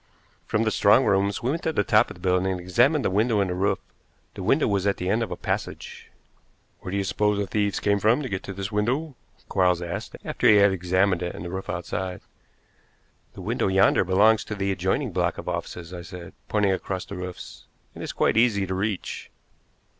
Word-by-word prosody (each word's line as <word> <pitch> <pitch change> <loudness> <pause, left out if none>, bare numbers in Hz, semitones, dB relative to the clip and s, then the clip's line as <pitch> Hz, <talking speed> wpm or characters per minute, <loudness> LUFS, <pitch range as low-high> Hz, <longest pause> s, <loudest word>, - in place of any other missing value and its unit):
From 105 - +1
the 110 - +1
strong 110 +6 +4
rooms 100 +1 +1
we 125 - +1
went 165 - -2
to 160 - -1
the 130 - +1
top 110 +3 +3
of - - -9
the - - -16
building 90 +1 +1
and 90 - -4
examined 135 - +2
the - - +1
window 110 +2 +2
and 95 -2 0
the - - -1
roof. 95 +3 +1 0.6
The - - -8
window 135 +11 +2
was 100 -2 0
at 100 - +1
the 90 - -3
end 110 +4 +2
of 115 - -2
a 90 - -4
passage. - - -5 0.7
"Where 90 - -7
do 100 - -1
you 100 - 0
suppose 105 +1 +1
the 100 - 0
thieves 100 +1 -1
came 100 0 +1
from 115 +8 +3
to - - -3
get 95 -5 -3
to 95 - -6
this 100 +1 -4
window?" 130 +8 -1 0.3
Quarles 90 -2 +2
asked, 85 -1 -5
after - - +1
he 110 - +7
had 100 -1 +6
examined 95 0 +1
it 90 0 -3
and 85 - -7
the 85 - -5
roof 95 +1 -5
outside. 90 +1 -4 1.1
"The - - -10
window - - -1
yonder 95 0 +4
belongs 105 +4 +4
to 105 - -5
the 100 -1 -1
adjoining 95 - -1
block - - 0
of - - -8
offices," 85 0 -5
I 90 - -6
said, 85 0 -10 0.2
pointing 105 -2 +2
across 95 0 -3
the 100 - -8
roofs. 90 -1 -8 0.3
"It - - -10
is - - -4
quite - - +1
easy 110 -4 +3
to 95 - -4
reach." 100 +1 -3
100 Hz, 220 wpm, -25 LUFS, 90-105 Hz, 1.1 s, he